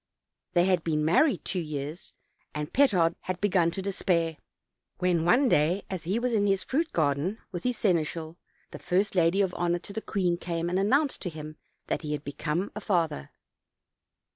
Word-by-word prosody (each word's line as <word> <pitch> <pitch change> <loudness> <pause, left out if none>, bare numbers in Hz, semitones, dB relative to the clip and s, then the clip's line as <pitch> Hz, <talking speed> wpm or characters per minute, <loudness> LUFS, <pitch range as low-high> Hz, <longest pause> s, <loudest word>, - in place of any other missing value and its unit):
They 175 0 +4
had 185 -3 +2
been 150 -2 0
married 240 - +3
two 185 - -1
years, 150 0 -5 0.4
and 150 0 -4
Petard 185 -12 +4
had 185 -1 -4
begun 180 -4 +3
to 190 +3 -5
despair, 170 -5 0 0.6
when 175 -2 +1
one 250 +10 +4
day 175 0 +2
as 180 -4 -5
lie 195 +5 +1
was 245 0 0
in 205 -2 +2
his 195 -1 +2
fruit 320 +5 0
46 - - -11
OLD, 160 - +4
OLD 140 - +2
FAT&J 140 - -7
TALES. 185 +8 -2
garden - - -29
with 175 - -5
his 250 -2 0
seneschal, 165 -3 0 0.3
the - - -8
first 195 +3 0
lady 180 +2 +3
of 190 -2 0
honor 175 0 +1
to 190 +3 -10
the 220 - -3
queen 180 -6 0
came 170 0 -3
and 185 - +1
announced 275 +9 +2
to 180 - -3
him 155 -1 -8 0.3
that - - -2
he 150 -2 -3
had 145 -1 -4
become 150 +6 -3
a 215 - -5
father. 165 - 0
175 Hz, 205 wpm, -28 LUFS, 160-200 Hz, 0.6 s, They